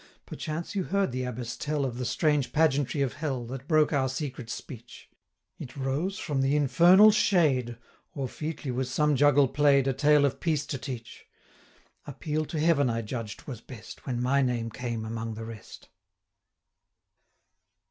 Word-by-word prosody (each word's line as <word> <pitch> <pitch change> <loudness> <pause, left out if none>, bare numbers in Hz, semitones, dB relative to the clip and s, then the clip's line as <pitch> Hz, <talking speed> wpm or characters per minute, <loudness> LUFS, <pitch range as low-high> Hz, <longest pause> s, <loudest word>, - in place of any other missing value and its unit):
Perchance 155 +4 -5
you 195 -3 -1
heard 200 -5 0
the 130 +1 -3
Abbess 120 -1 -5
tell 150 -2 -2
Of 125 -2 -4
the 125 - -2
strange 150 +2 +1
pageantry 145 -2 +2
of 130 -5 -2
Hell, 135 -3 -3
That 130 +3 -8
broke 155 -1 +3
our 135 -2 +1
secret 130 -3 -5
speech 120 -2 -9 0.5
It 130 - -9
rose 145 +9 -2
from 145 -9 -2
the 135 +2 +2
infernal 170 +9 +6
shade, 145 - +2 0.4
260 - - -7
Or 135 - -1
featly 150 0 -5
was 125 +1 -2
some 150 +2 +2
juggle 145 0 +5
play'd, 140 0 +3
A 135 - +2
tale 145 +2 +4
of 140 - -1
peace 155 -4 0
to 135 - -4
teach. 120 -4 -8 0.8
Appeal 150 +3 -3
to 155 - -4
Heaven 150 -4 +3
I 115 0 -2
judged 110 -1 -6
was 125 -5 -7
best, 115 0 -12
When 125 -2 -2
my 140 +2 +2
name 120 -3 -1
came 115 -2 -4
among 115 0 -4
the 115 +1 -7
rest. 110 -3 -11
135 Hz, 170 wpm, -28 LUFS, 125-150 Hz, 0.8 s, infernal